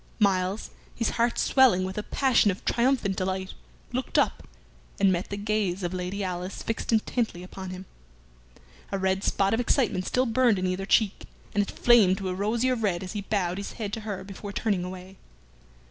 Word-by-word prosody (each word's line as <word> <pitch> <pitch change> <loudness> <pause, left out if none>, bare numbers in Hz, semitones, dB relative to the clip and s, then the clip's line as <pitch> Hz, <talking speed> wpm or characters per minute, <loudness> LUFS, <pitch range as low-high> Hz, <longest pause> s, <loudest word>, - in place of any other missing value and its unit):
Myles, 195 -1 +1 0.2
his 230 - 0
heart 235 +1 +1
swelling 255 -9 +4
with 190 0 -4
a 210 - -2
passion 255 -1 +3
of 195 +2 -4
triumphant 235 -5 +2
delight, 190 0 -2 0.4
looked 255 +1 -2
up - - +1 0.5
and 195 -1 +5
met 180 0 -1
the 200 - -4
gaze 205 -3 -1
of 175 +1 -2
Lady 185 +2 -3
Alice 180 0 -4
fixed 225 - -2
intently 220 -4 0
upon 190 0 -8
him. 185 +1 -7 1.1
A 195 - 0
red 190 0 0
spot 195 +1 +1
of 225 - +1
excitement 230 -7 +1
still 255 +1 +2
burned 235 -2 +3
in 185 - -1
either 185 +1 -2
cheek, 215 -3 +2 0.3
and 205 - +3
it 200 - -2
flamed 215 -6 +5
to 190 -1 -3
a - - -1
rosier 225 +7 +1
red 195 -6 -1
as 185 - -6
he 205 - -3
bowed 195 -3 -1
his 200 - -6
head 210 -3 -5
to 225 - -2
her 210 -3 -5
before 200 +1 -8
turning 200 -3 0
away. 185 +1 -8
200 Hz, 190 wpm, -27 LUFS, 185-225 Hz, 1.1 s, and